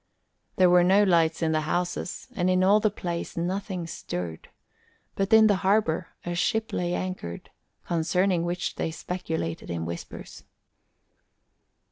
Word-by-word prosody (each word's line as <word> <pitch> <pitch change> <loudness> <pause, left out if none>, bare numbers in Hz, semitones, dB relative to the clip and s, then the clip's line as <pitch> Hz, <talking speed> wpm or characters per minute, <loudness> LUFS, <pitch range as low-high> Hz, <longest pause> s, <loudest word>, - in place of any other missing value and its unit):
There 185 - +5
were 180 0 +6
no 195 +3 +5
lights 170 -4 +3
in 160 - +2
the 155 0 +1
houses 175 +3 -3
and 180 0 +1
in 185 0 +3
all 200 +3 +5
the 215 0 +2
place 175 -5 -5
nothing 185 +1 -2
stirred; 90 - -6 0.6
but 195 +2 -1
in 220 0 +8
the 205 -3 +4
harbour 190 -4 +1 0.2
a 175 - -2
ship 220 +5 0
lay 175 0 -1
anchored, 185 - -5 0.3
concerning 175 +2 +1
which 175 +1 -3
they - - -1
speculated 165 -1 -4
in 85 -1 -3
whispers. 85 0 -8
180 Hz, 140 wpm, -26 LUFS, 165-190 Hz, 0.6 s, in